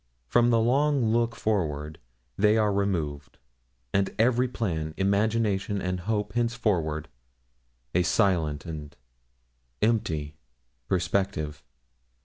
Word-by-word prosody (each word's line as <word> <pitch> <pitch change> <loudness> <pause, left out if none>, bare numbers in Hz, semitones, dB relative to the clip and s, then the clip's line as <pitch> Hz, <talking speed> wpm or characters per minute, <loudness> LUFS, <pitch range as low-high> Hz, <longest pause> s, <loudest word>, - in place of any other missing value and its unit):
From 120 - +3
the 115 -1 +4
long 130 0 +2
look 115 0 +1
forward 80 -8 -2 0.4
they 105 +5 +4
are 105 -2 +2
removed, 80 -8 -2 0.6
and 100 -1 +2
every 125 +3 +3
plan, 80 -10 -3
imagination, 100 0 +1
and 90 0 -2
hope 105 +2 -2
henceforth 105 -11 0 0.9
a 90 - +3
silent 85 -7 +1
and 75 -3 -7 0.9
empty 80 -10 0 0.5
perspective. 90 -5 -1
100 Hz, 100 wpm, -27 LUFS, 80-115 Hz, 0.9 s, the